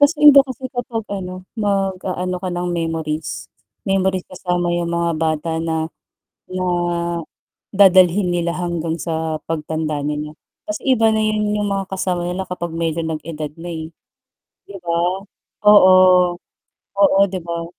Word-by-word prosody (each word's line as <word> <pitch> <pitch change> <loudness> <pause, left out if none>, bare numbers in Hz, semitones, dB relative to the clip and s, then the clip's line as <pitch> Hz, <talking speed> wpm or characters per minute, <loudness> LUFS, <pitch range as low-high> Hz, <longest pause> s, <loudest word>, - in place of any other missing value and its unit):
As 285 +3 +5
in 295 0 +8
daw 275 0 +6
kasi 260 0 -6
kapag 245 -2 -3
ano, 185 -2 -5 0.2
mag-aano 190 -3 -1
ka 185 0 -4
ng 175 0 -2
memories, 160 -5 -3 0.3
memories 190 -1 0
kasama 180 -1 -1
yung 170 0 -1
mga 170 0 +1
bata 160 0 -1
na, 160 0 -2 0.6
na 185 0 -2 1.1
dadalhin 190 -1 +5
nila 170 -1 -1
hanggang 170 -2 -2
sa 160 -2 -3
pagtanda 155 -1 -2
nila. 150 +1 -4 0.3
Kasi 310 - -5
iba 225 -2 +3
na 220 - +1
'yun 215 -1 0
yung 210 - -1
mga 195 -1 -2
kasama 185 -2 -1
nila 190 +1 -3
kapag 175 -1 -5
medyo 165 0 -2
nag 160 -1 -3
edad 155 -2 -5
na, 175 +1 -7
eh. 160 0 -6 0.8
Di 200 - -12
ba, 175 +2 0 0.5
oo. 195 -3 +8 1.1
Oo, 195 -1 +5 0.2
'di 185 - -3
ba? 170 0 -4
175 Hz, 145 wpm, -19 LUFS, 165-195 Hz, 1.1 s, in